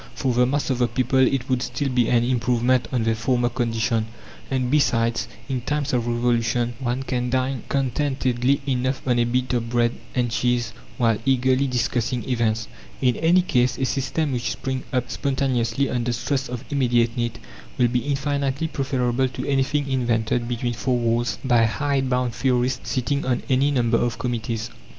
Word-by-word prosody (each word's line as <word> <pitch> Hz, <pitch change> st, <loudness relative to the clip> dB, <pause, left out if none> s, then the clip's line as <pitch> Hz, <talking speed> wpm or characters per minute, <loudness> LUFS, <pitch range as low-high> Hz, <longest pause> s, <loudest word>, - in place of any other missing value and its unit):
For 130 Hz, -2 st, 0 dB
the 125 Hz, +1 st, +3 dB
mass 140 Hz, +1 st, 0 dB
of 130 Hz, -, -1 dB
the 120 Hz, -, +3 dB
people 130 Hz, +3 st, +1 dB
it 130 Hz, -1 st, +2 dB
would 130 Hz, -2 st, 0 dB
still 125 Hz, +3 st, -2 dB
be 125 Hz, -2 st, +2 dB
an 120 Hz, -1 st, +3 dB
improvement 125 Hz, 0 st, +1 dB
on 125 Hz, -3 st, 0 dB
their 115 Hz, 0 st, +2 dB
former 120 Hz, +2 st, +1 dB
condition; 115 Hz, -2 st, 0 dB, 0.4 s
and, 130 Hz, -2 st, 0 dB
besides, 115 Hz, -6 st, +2 dB, 0.2 s
in 130 Hz, -3 st, -2 dB
times 145 Hz, +2 st, -2 dB
of 120 Hz, -1 st, +1 dB
Revolution 120 Hz, 0 st, +1 dB
one 125 Hz, +1 st, -2 dB
can 125 Hz, -2 st, -2 dB
dine 130 Hz, 0 st, 0 dB
contentedly 135 Hz, -1 st, 0 dB
enough 130 Hz, 0 st, -1 dB
on 120 Hz, -1 st, +3 dB
a 120 Hz, -, +3 dB
bit 125 Hz, +1 st, 0 dB
of 115 Hz, -1 st, -1 dB
bread 120 Hz, -1 st, +2 dB, 0.2 s
and 120 Hz, -2 st, +1 dB
cheese 120 Hz, +1 st, 0 dB, 0.2 s
while 115 Hz, -4 st, +2 dB
eagerly 130 Hz, +1 st, +2 dB
discussing 120 Hz, -2 st, -1 dB
events. 115 Hz, -3 st, 0 dB, 0.3 s
In 125 Hz, -2 st, +2 dB
any 175 Hz, +3 st, +4 dB
case, 125 Hz, -7 st, +1 dB
a 130 Hz, -, 0 dB
system 135 Hz, +3 st, -1 dB
which 125 Hz, -2 st, -1 dB
springs 130 Hz, -1 st, -4 dB
up 125 Hz, -1 st, -1 dB
spontaneously, 130 Hz, -2 st, 0 dB
under 120 Hz, -1 st, -1 dB
stress 130 Hz, +3 st, -2 dB
of 125 Hz, +1 st, -6 dB
immediate 120 Hz, -4 st, +2 dB
need, 120 Hz, -2 st, -2 dB, 0.4 s
will 125 Hz, -, +4 dB
be 125 Hz, +1 st, +1 dB
infinitely 140 Hz, +2 st, -1 dB
preferable 130 Hz, -3 st, 0 dB
to 125 Hz, 0 st, -6 dB
anything 140 Hz, +1 st, +1 dB
invented 120 Hz, -2 st, 0 dB
between 120 Hz, 0 st, -2 dB
four 125 Hz, +2 st, 0 dB
walls 120 Hz, 0 st, 0 dB
by 120 Hz, -3 st, +4 dB
hide 135 Hz, +3 st, 0 dB
bound 125 Hz, -1 st, 0 dB
theorists 125 Hz, 0 st, 0 dB
sitting 140 Hz, +2 st, 0 dB
on 125 Hz, -2 st, -1 dB
any 135 Hz, +2 st, +3 dB
number 120 Hz, -4 st, +2 dB
of 120 Hz, -1 st, -1 dB
committees. 115 Hz, -2 st, -3 dB
125 Hz, 175 wpm, -23 LUFS, 120-135 Hz, 0.4 s, any